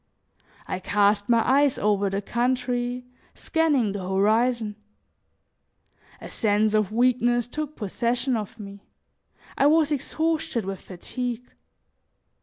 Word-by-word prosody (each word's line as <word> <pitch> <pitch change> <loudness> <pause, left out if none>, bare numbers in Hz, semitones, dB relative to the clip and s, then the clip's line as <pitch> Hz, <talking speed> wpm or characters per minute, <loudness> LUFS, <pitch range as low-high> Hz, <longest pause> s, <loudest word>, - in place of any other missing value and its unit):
I 185 - -4
cast 205 +2 +2
my 230 -1 +3
eyes 275 +1 +3
over 205 -1 +1
the 195 +1 -3
country, 245 +1 -1 0.3
scanning 295 -10 +1
the 200 - -4
horizon. 220 +3 +1 1.4
A - - -9
sense 215 -1 +1
of 215 -2 +1
weakness 240 0 +2
took 305 +4 -5
possession 240 +5 -1
of 220 +1 -5
me; 200 -1 -9 0.8
I 280 - +5
was 310 0 +3
exhausted 310 -5 -1
with 195 0 -5
fatigue. 245 +6 -5
235 Hz, 110 wpm, -25 LUFS, 205-255 Hz, 1.4 s, I